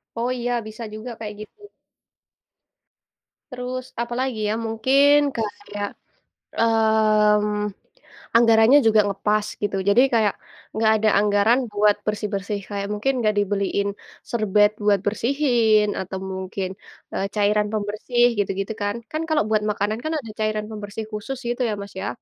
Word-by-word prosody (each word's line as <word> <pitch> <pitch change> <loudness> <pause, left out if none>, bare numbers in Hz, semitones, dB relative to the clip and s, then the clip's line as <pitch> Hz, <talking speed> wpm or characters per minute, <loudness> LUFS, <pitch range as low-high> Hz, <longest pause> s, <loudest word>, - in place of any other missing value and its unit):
Oh 235 +2 -1
iya, 245 0 -2 0.2
bisa 220 +2 -8
juga 220 +3 -7
kaya 215 -1 -5
gitu. 215 - -12 1.9
Terus 255 0 -5 0.2
apalagi 240 0 -2
ya? - - +1
Mungkin 270 +6 +4 0.2
kayak, 205 -2 -4 0.7
mmm, 215 -2 +3 0.6
anggarannya 230 +3 +6
juga 215 -1 +5
ngepas 210 +1 0 0.2
gitu. 205 -1 -1
Jadi 215 +5 +5
kayak, 215 -3 +3 0.4
nggak 220 0 +3
ada 215 0 +2
anggaran 210 +4 +3
buat 205 0 +3
bersih-bersih, 205 -1 -2
kayak 200 -1 -3
mungkin 245 +6 0
nggak 215 -1 +1
dibeliin 200 0 0 0.4
serbet 210 -2 +3
buat 205 -2 +4
bersihin, 230 -2 +2
atau 190 +1 -5 0.2
mungkin, 190 0 -4 0.4
eee, 195 - -1
cairan 210 0 +2
pembersih 215 +4 +1
gitu-gitu 195 +1 -2
kan. 205 +1 -1 0.2
Kan 310 +1 -2
kalau 310 -7 +2
buat 215 -1 +2
makanan 210 +2 -2
kan 315 - -2
ada 225 -6 -9
cairan 215 -1 -1
pembersih 210 +1 -6
khusus 215 +5 -5
gitu 240 +2 -2
ya - - -1
Mas, 200 - -9
ya, 200 - -3
215 Hz, 135 wpm, -23 LUFS, 205-230 Hz, 1.9 s, anggarannya